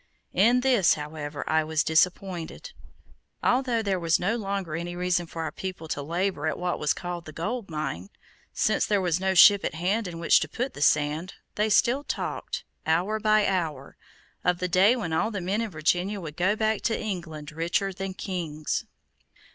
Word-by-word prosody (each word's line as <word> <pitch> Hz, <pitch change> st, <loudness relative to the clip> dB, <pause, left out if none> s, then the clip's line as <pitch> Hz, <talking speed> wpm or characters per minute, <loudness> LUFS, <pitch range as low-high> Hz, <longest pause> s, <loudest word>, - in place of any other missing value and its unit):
In 240 Hz, +5 st, +4 dB
this, 250 Hz, -9 st, +4 dB
however, 150 Hz, -1 st, -6 dB
I 160 Hz, 0 st, +2 dB
was 155 Hz, 0 st, 0 dB
disappointed. 180 Hz, -, 0 dB, 0.7 s
Although 245 Hz, -3 st, +2 dB
there 195 Hz, -3 st, 0 dB
was 165 Hz, -1 st, +2 dB
no 195 Hz, +6 st, 0 dB
longer 195 Hz, -7 st, -3 dB
any 175 Hz, +1 st, -4 dB
reason 180 Hz, -1 st, 0 dB
for 165 Hz, 0 st, -5 dB
our 160 Hz, -, -3 dB
people 185 Hz, -1 st, -6 dB
to 145 Hz, -, -2 dB
labor 170 Hz, +1 st, -1 dB
at 155 Hz, -, -1 dB
what 180 Hz, 0 st, -2 dB
was 150 Hz, -, +1 dB
called 175 Hz, -2 st, -5 dB
the 155 Hz, -, -8 dB
gold 205 Hz, +7 st, -4 dB
mine, 135 Hz, -, -4 dB, 0.4 s
since -, -, +1 dB
there 205 Hz, -1 st, +2 dB
was 175 Hz, -2 st, 0 dB
no 190 Hz, 0 st, 0 dB
ship 200 Hz, +2 st, +8 dB
at -, -, -2 dB
hand 190 Hz, +6 st, 0 dB
in 170 Hz, -1 st, -6 dB
which 170 Hz, -, +4 dB
to -, -, -3 dB
put 250 Hz, +3 st, -3 dB
the -, -, -9 dB
sand, 150 Hz, +5 st, +1 dB, 0.2 s
they 210 Hz, +1 st, 0 dB
still 240 Hz, +6 st, +3 dB
talked, -, -, -4 dB, 0.2 s
hour 180 Hz, +7 st, +1 dB
by 215 Hz, -1 st, +3 dB
hour, 160 Hz, -8 st, -2 dB, 0.5 s
of 180 Hz, 0 st, +2 dB
the 180 Hz, -, -2 dB
day 195 Hz, +6 st, +5 dB
when 175 Hz, -10 st, -3 dB
all 160 Hz, -, +1 dB
the 205 Hz, -3 st, -4 dB
men 195 Hz, +5 st, -1 dB
in 230 Hz, -, -2 dB
Virginia 180 Hz, +4 st, 0 dB
would 155 Hz, -4 st, -7 dB
go 185 Hz, +5 st, +2 dB
back 220 Hz, -1 st, 0 dB
to 225 Hz, -, 0 dB
England 165 Hz, -8 st, -5 dB
richer 170 Hz, +5 st, -1 dB
than 190 Hz, 0 st, -5 dB
kings. 165 Hz, -6 st, -3 dB
180 Hz, 185 wpm, -26 LUFS, 160-205 Hz, 0.7 s, ship